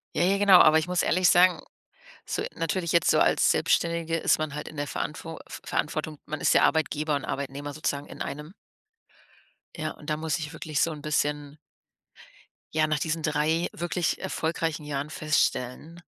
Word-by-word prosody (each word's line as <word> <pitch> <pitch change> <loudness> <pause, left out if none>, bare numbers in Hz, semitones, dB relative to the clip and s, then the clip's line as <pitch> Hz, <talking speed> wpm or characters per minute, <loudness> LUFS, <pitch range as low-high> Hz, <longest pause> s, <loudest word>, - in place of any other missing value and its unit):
Ja, - - +1
ja 195 +2 +2
genau, 200 -2 +7
aber 155 -1 +7
ich 160 - -2
muss 180 -1 +1
ehrlich 180 +1 +3
sagen 180 -1 +5 0.6
so - - -3
natürlich 165 +1 -2
jetzt 170 - +4
so - - +3
als - - +4
Selbstständige 170 -1 +1
ist 165 - +2
man 155 -2 -3
halt 150 - -5
in 155 - -13
der 145 - -2
Verantwo 160 +3 -5
f - - -9
Verantwortung, 155 0 -2
man 155 0 -5
ist - - +3
ja - - +5
Arbeitgeber 155 -1 +1
und 140 - -4
Arbeitnehmer 140 +1 -4
sozusagen 145 -1 -3
in - - -7
einem. 150 +5 -7 1.2
Ja, 155 -1 -3
und 150 - -16
da 150 - +1
muss 155 0 -2
ich 150 -2 -6
wirklich 155 -2 -3
so 165 - +2
'n 150 - -9
bisschen 150 -1 -1 1.2
ja, 155 0 +3
nach 155 -1 0
diesen 160 +2 -2
3 155 +2 +1
wirklich 175 0 -2
erfolgreichen 160 -1 -2
Jahren 145 0 -3
feststellen, 155 +1 -1
155 Hz, 180 wpm, -26 LUFS, 150-165 Hz, 1.2 s, genau